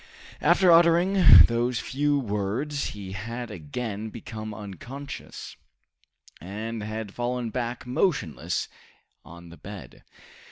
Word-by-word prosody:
After 185 -2 +5
uttering 175 +3 +7
those 120 +1 0
few 145 +4 0
words 120 +5 -2
he 95 -2 -7
had 115 +4 -5
again 110 -4 -5
become 110 -1 -7
unconscious, 110 - -8 0.9
and 110 +5 -5
had 110 -1 -5
fallen 120 -1 -2
back 120 0 -3
motionless 125 - -1 0.6
on 85 +2 -13
the 85 - -12
bed. 100 -3 -10
115 Hz, 105 wpm, -26 LUFS, 105-135 Hz, 0.9 s, uttering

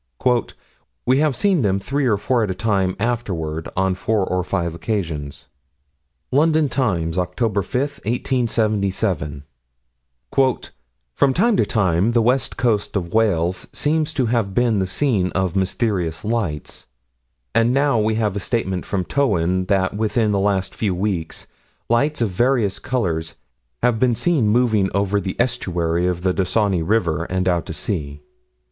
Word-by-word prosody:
"We 130 +2 +3
have 150 -3 +2
seen 190 +1 +2
them 100 -3 +1
three 135 +6 -1
or 105 -4 +2
four 120 +4 +1
at 105 - -1
a 95 - -2
time 95 -3 0
afterward, 90 -9 -2
on 95 0 +2
four 100 +1 0
or 90 -1 -1
five 85 -1 -2
occasions." 80 - -4 0.8
London 155 +1 +3
Times, 90 -12 -1
Oct. 90 -1 -2 0.3
5, - - -10 0.3
1877: 105 - 0 0.9
"From 115 - -1
time 225 +5 +3
to - - +3
time 100 0 +1
the 115 - +4
west 125 +3 +1
coast 110 -5 0
of 85 -3 -2
Wales 95 -5 +1
seems 155 +1 0
to 130 - +1
have 110 -4 0
been 120 -4 +2
the 95 - 0
scene 95 -3 0
of 95 -1 -1
mysterious 95 -4 -1
lights.... 105 -10 -3 0.7
And 115 +1 +3
now 140 -2 +2
we 110 +1 +1
have 105 -3 0
a - - -1
statement 95 -4 -2
from 95 -3 -1
Towyn 95 -9 +1
that 95 0 +1
within 110 0 +1
the 100 - +1
last 95 -1 0
few 100 -5 -1
weeks 90 -4 -3 0.4
lights 140 +5 +1
of 115 - +2
various 115 0 +1
colors 90 -12 -2 0.5
have 120 -2 +2
been 125 -1 +3
seen 150 -3 +2
moving 110 -3 +2
over 100 0 +1
the 95 -1 -4
estuary 90 -8 0
of 90 -1 -2
the 95 -1 +2
Dysynni 95 -1 +1
River, 85 -4 0
and 95 +1 -1
out 85 -2 +1
to - - -5
sea. 70 0 -4
100 Hz, 150 wpm, -21 LUFS, 90-120 Hz, 0.9 s, the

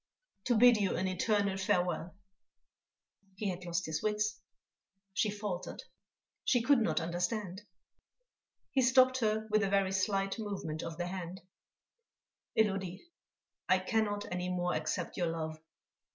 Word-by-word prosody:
"To 240 -3 +3
bid 245 0 +7
you 200 -2 +1
an 190 - 0
eternal 200 +1 +1
farewell." 180 -3 0 1.2
He 200 +1 -2
had 180 0 -5
lost 170 0 -1
his 160 -1 -2
wits, 210 0 0 0.7
she 210 - +2
faltered, 205 -3 -4 0.6
she 245 -3 +3
could 275 +1 +5
not 220 - +1
understand.... 180 +3 -2 1.1
He 270 - +3
stopped 255 0 +5
her 220 -1 0
with 215 0 +4
a 200 - +1
very 195 -1 +2
slight 195 +2 0
movement 195 -7 -4
of 165 -1 -6
the 175 - -2
hand: 180 0 -5 1.2
"Élodie, 195 -4 +1 0.7
I 185 - +6
cannot 205 +1 0
any 180 0 -2
more 180 -1 0
accept 160 +3 -2
your 175 - +1
love." 160 -1 -3
195 Hz, 135 wpm, -33 LUFS, 180-215 Hz, 1.2 s, bid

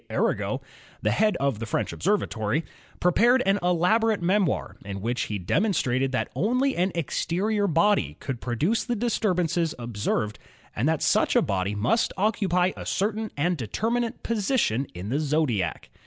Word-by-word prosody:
Arago, - - -1 0.4
the - - +2
head 215 -1 +2
of 135 -6 0
the 115 - -3
French - - -1
Ob - - -10
servatory, 155 - 0 0.4
prepared 240 +9 +4
an 195 +1 +3
elaborate 190 +6 +2
memoir 185 +1 0
in 100 -1 -5
which 120 +5 -1
he 105 - -2
demonstrated 130 - +1
that 130 - -2
only 255 +8 +1
an 185 +2 +1
exterior 195 +6 0
body 165 - +2
could 130 -4 -5
produce 150 - 0
the 240 - -2
disturbances 180 -8 0
observed 110 -2 -2 0.4
and 125 +8 +1
that 160 -2 0
such - - +2
a - - +6
body 100 +1 -1
must 120 - +1
occupy 190 -3 +2
a - - -7
certain 215 +2 -1
and 175 +4 +1
determinate 225 - -2
position 205 - 0
in 90 +4 -6
the 140 +5 0
zodiac. 140 - -1
170 Hz, 155 wpm, -26 LUFS, -, 0.4 s, a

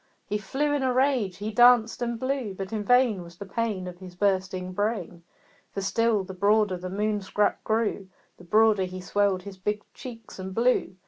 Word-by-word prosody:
He 210 +1 -2
flew 290 +7 -1
in 290 - 0
a 260 -1 +1
rage 255 -8 +1
he 210 +2 -4
danced 240 0 +5
and 235 -1 -2
blew; 255 -6 -2
But 195 +2 -6
in 215 -1 -2
vain 245 -3 +3
Was 170 0 -12
the 200 - -7
pain 210 -2 -2
Of 180 -1 -9
his 185 -2 -11
bursting 185 -1 0
brain; 205 -3 -2 0.5
For 200 - -3
still 220 +1 +1
the 190 - -8
broader 205 +1 +2
the 185 +1 -6
Moon 210 +2 -1
scrap 205 +2 0
grew, 220 -3 0 0.3
The - - -14
broader 210 +1 +4
he 185 0 -7
swelled 190 0 0
his 195 -1 -10
big 210 +2 -2
cheeks 230 -5 -10
and 190 0 -6
blew. 240 -5 +2
205 Hz, 195 wpm, -26 LUFS, 190-230 Hz, 0.5 s, danced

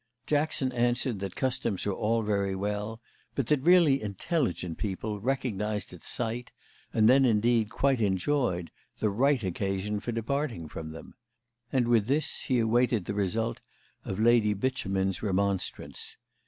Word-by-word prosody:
Jackson 145 -3 +1
answered 120 -2 0
that 95 -1 -5
customs 130 -7 -1
were 100 - 0
all 115 +2 0
very 100 -2 0
well, 105 +3 -3 0.4
but 135 - 0
that 150 +1 +2
really 165 -4 +5
intelligent 100 - -2
people 105 +1 -3
recognised 110 -5 -2
at 90 - -11
sight, 120 +1 -2 0.4
and 110 -1 +4
then 135 +3 +6
indeed 115 -2 +3
quite 135 +1 +1
enjoyed, 95 -2 0 0.3
the 105 - 0
right 130 +3 +2
occasion 95 +2 -2
for 120 - -4
departing 115 - -2
from 80 +1 -7
them; 80 +1 -10 0.6
and 125 -3 +2
with 115 -3 +3
this 145 +4 0
he 130 - +2
awaited 115 -2 +2
the - - -3
result 105 +3 -1 0.4
of 95 - -4
Lady 110 -2 +4
Beauchemin's 95 -5 -1
remonstrance. 100 -2 -2
110 Hz, 140 wpm, -29 LUFS, 100-125 Hz, 0.6 s, then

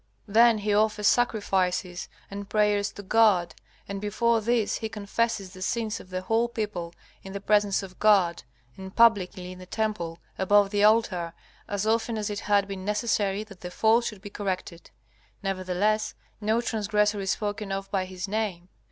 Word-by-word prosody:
Then 230 +2 +5
he 210 0 -1
offers 210 0 +2
sacrifices 190 -6 +1 0.2
and 200 0 -7
prayers 210 -1 +2
to 205 - -9
God. 195 -5 +3 0.3
And 200 0 -5
before 225 +2 +1
this 230 -1 +1
he 220 - -4
confesses 205 -1 -2
the 185 - -11
sins 220 +2 -1
of 185 - -13
the 185 0 -3
whole 225 +4 +2
people, 200 -7 -4 0.3
in 195 - -9
the 200 - -4
presence 205 -1 +2
of 185 -1 -11
God, 190 -5 +4 0.4
and 190 0 -9
publicly 195 -5 +3
in 185 - -10
the 185 - -11
temple, 195 -6 -2 0.2
above 200 +1 +4
the 205 -1 +2
altar, 210 -6 +3 0.3
as 205 0 -2
often 225 +1 +1
as 210 0 -2
it 205 - -3
had 200 -1 +2
been 195 -1 -6
necessary 210 -1 0
that 200 -4 -15
the 180 - -5
fault 225 +5 +3
should 205 -4 -5
be 205 - -8
corrected. 185 -4 -4 0.5
Nevertheless, 195 +3 0 0.3
no 220 +3 +1
transgressor 210 -2 0
is 195 -1 -3
spoken 205 0 -2
of 195 0 -4
by 190 -2 0
his 185 +1 -6
name. 195 -4 -3
205 Hz, 170 wpm, -27 LUFS, 190-215 Hz, 0.5 s, Then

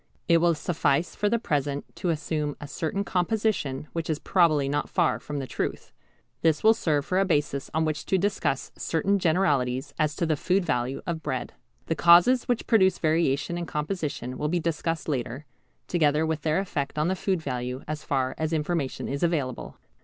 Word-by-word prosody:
It 170 - +6
will 170 0 +3
suffice 155 0 0
for 205 - +1
the 235 - +2
present 145 - -1
to 180 - -1
assume 150 -2 -2
a 145 - -7
certain 160 +8 -2
composition 180 -8 -1
which 165 -1 -3
is 155 - +1
probably 155 -5 +3
not 145 +1 -1
far 175 -4 +1
from 150 - -6
the 135 - -3
truth. - - -4 0.5
This 160 -2 +2
will 220 +1 +7
serve 150 -10 0
for 185 - +1
a - - +4
basis 150 -6 0
on 160 +1 +1
which 155 -1 -3
to 190 - +3
discuss 185 -8 -1
certain 195 +5 0
generalities 145 -7 +1
as 155 -1 +1
to 170 - 0
the 155 -1 +1
food 180 +5 +1
value 125 0 -1
of 165 -2 -3
bread. 130 -5 -3 0.3
The - - 0
causes 175 +10 +6
which 245 -2 -1
produce 190 -5 +4
variation 160 0 +1
in 170 - -4
composition 150 -5 -3
will 150 - 0
be 175 +2 +1
discussed 165 0 -2
later, 130 -1 -3 0.4
together 155 -2 +2
with 160 -1 -2
their 155 0 +1
effect 155 -8 -2
on 150 +2 +2
the 190 - +1
food 190 0 0
value 125 -3 -4
as 155 0 -4
far 130 -2 0
as 160 +1 -1
information 155 -3 -1
is 140 +1 -3
available. 150 -8 -1
155 Hz, 190 wpm, -26 LUFS, 145-175 Hz, 0.5 s, will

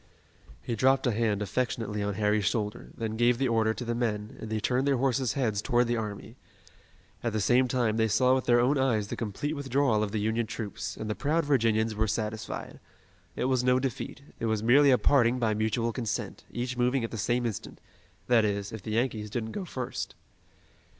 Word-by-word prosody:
He 120 - -2
dropped 135 +4 +3
a 125 - +3
hand 105 -2 0
affectionately 105 -1 -2
on 100 -1 -2
Harry's 105 0 +1
shoulder, 105 0 -2
then 110 -1 -3
gave 120 +1 +3
the 135 +1 +1
order 115 -2 +2
to 125 - -5
the 120 - -1
men 110 -3 -2
and 110 - -6
they 110 0 -1
turned 130 +5 0
their 140 -2 +3
horses' 130 -1 +1
heads 110 -7 0
toward 120 +2 +2
the 120 0 0
army. 105 -3 -5 0.9
At 115 -2 -1
the 110 - 0
same 120 +6 +3
time 120 -4 0
they 110 0 +3
saw 125 +5 +3
with 130 -1 0
their 120 -1 +5
own 135 +4 +3
eyes 110 -6 +1
the - - -3
complete 115 +7 -3
withdrawal 135 -5 +1
of 105 -2 -1
the 110 - -1
Union 110 +2 0
troops, 100 -4 -5
and 110 - -5
the 105 - -1
proud 155 +6 0
Virginians 115 -5 +2
were 110 +1 0
satisfied. 110 0 -4 0.6
It - - -1
was 130 -1 +2
no 125 0 +4
defeat. 130 +1 -4 0.2
It 115 - -1
was 110 -1 0
merely 140 +5 +6
a 130 - +6
parting 125 -3 +3
by 115 -3 +1
mutual 110 +2 0
consent, 115 -4 -4
each 125 +1 -3
moving 125 +1 +1
at 115 - -3
the 115 - -5
same 120 +3 0
instant, 110 -4 -5 0.5
that 120 -2 +4
is, 100 -1 -1
if 110 - -7
the 110 - -5
Yankees 110 -2 -1
didn't 110 0 -3
go 190 - -4
first. 130 -7 -5
115 Hz, 210 wpm, -28 LUFS, 110-125 Hz, 0.9 s, merely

